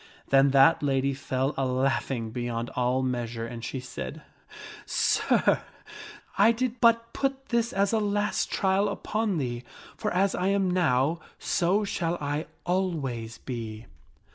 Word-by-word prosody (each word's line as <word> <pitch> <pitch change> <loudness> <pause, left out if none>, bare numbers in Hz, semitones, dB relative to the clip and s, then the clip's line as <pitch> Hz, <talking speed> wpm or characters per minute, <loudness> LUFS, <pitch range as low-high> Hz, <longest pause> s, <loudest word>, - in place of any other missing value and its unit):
Then 135 0 +5
that 140 +4 +5
lady 135 -1 +1
fell 135 +1 -1
a 135 - -1
laughing 130 -2 0
beyond 120 -1 -3
all 125 +1 0
measure 120 -2 -2
and 115 0 -7
she 130 - -4
said, 125 - -7 0.4
" - - -12
Sir, - - +2 0.8
I 230 - +7
did 250 +1 -2
but 230 -1 +4
put 270 0 -2
this 235 -1 +1
as 200 +2 +1
a 225 - +3
last 205 0 0
trial 195 +1 +2
upon 210 -1 -1
thee, 120 -4 -3 0.3
for 210 -2 -2
as 190 +2 +2
I 185 - 0
am 195 -2 +2
now, 160 -3 +2 0.2
so 185 +5 +1
shall 175 -4 -1
I 145 +2 -2 0.2
always 145 -11 -2
be." 115 -3 -6
145 Hz, 145 wpm, -27 LUFS, 125-200 Hz, 0.8 s, I